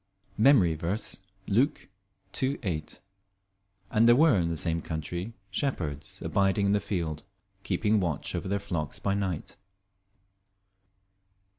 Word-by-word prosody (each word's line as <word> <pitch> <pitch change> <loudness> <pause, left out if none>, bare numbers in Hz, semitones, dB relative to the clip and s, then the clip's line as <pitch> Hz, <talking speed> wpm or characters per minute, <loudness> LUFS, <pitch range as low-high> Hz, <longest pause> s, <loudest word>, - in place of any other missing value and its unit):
MEMORY 110 - +6
VERSE, 85 +8 -3 0.3
Luke 130 +9 +1 0.5
2: 135 +1 0
8 75 -6 -4 0.9
"And 115 +2 +4
there 120 - +8
were 155 0 +6
in 85 -3 +1
the 85 - -2
same 85 +1 -1
country 85 +7 -4 0.2
shepherds 80 - -3
abiding 100 +1 +2
in 100 - +3
the 105 - +3
field, 80 -7 -3 0.4
keeping 105 +3 +1
watch 85 -7 -2
over - - -3
their 100 +1 +1
flocks 80 -6 -3
by 100 - 0
night." 95 -5 -3
95 Hz, 125 wpm, -28 LUFS, 85-110 Hz, 0.9 s, there